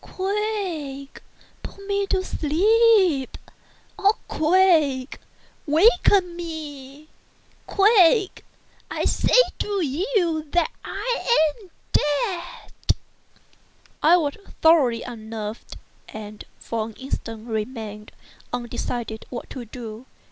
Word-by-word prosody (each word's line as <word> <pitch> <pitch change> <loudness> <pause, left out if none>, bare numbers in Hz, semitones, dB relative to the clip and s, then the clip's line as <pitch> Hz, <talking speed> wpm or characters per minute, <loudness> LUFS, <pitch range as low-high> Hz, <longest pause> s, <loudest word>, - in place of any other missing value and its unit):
—quick!—put 380 -4 -5
me 400 0 0
to 380 -2 0
sleep—or, 390 - +1
quick!—waken 340 - +2 1.3
me!—quick!—I 400 -1 +2
say - - +2 0.2
to 400 -4 -1
you 335 - 0
that 350 +7 +2
I 440 -5 +1
am 375 - -17 0.2
dead!" 340 +4 -1 1.3
I 335 +4 +6
was 295 -5 -1 0.3
thoroughly 285 -8 +5
unnerved, 220 -2 -7 0.3
and 215 -1 -9
for 225 -1 -3
an 225 - -10
instant 230 -3 -6
remained 215 -2 -5 0.4
undecided 240 -2 -4
what 245 - -7
to 250 -3 -7
do. 230 +1 -9
315 Hz, 75 wpm, -23 LUFS, 240-390 Hz, 1.3 s, I